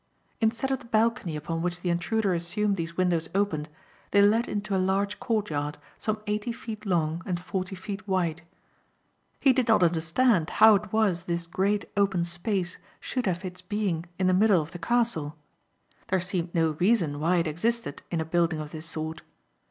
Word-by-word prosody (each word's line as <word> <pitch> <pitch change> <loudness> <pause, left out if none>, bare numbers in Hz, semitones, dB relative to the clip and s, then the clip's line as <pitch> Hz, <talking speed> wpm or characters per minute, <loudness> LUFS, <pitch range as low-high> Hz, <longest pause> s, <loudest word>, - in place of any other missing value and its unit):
Instead 230 +4 +1
of 265 - 0
the - - -14
balcony 230 -6 +1
upon 165 +2 -3
which 175 +1 -2
the 175 - 0
intruder 195 +3 +1
assumed 195 +5 0
these 170 -1 -5
windows 175 -3 +1
opened, 165 -7 0 0.4
they 200 - +4
led 220 +4 +4
into 205 -1 -2
a 190 - +2
large 195 +2 0
courtyard 160 - -1 0.2
some 215 -1 -1
eighty 210 +3 -1
feet 220 -2 -7
long 165 -2 +1
and 180 -2 -2
forty 185 +1 -4
feet 195 +2 -7
wide. 175 -4 0 1.0
He 270 -2 +5
did 255 -1 +1
not 220 -5 +5
understand 170 +3 +2
how 220 0 +7
it 205 0 0
was 200 -6 +1
this 170 -1 -1
great 200 +4 0
open 195 -4 +2
space 175 +1 -2 0.2
should 250 -4 -2
have 185 +1 -1
its 180 0 -6
being 185 -3 -2
in 185 - 0
the 185 - +4
middle 200 -1 +5
of 155 - -12
the 175 - -8
castle. 170 -7 0 0.7
There 190 - +1
seemed 180 -1 -2
no 165 -1 +3
reason 175 -7 +2
why 170 +4 +2
it 170 -2 +2
existed 230 +10 -1
in 170 - -1
a 160 - -1
building 165 -1 +1
of 150 -1 -6
this 160 0 -7
sort. 160 0 -4
185 Hz, 185 wpm, -27 LUFS, 170-210 Hz, 1.0 s, how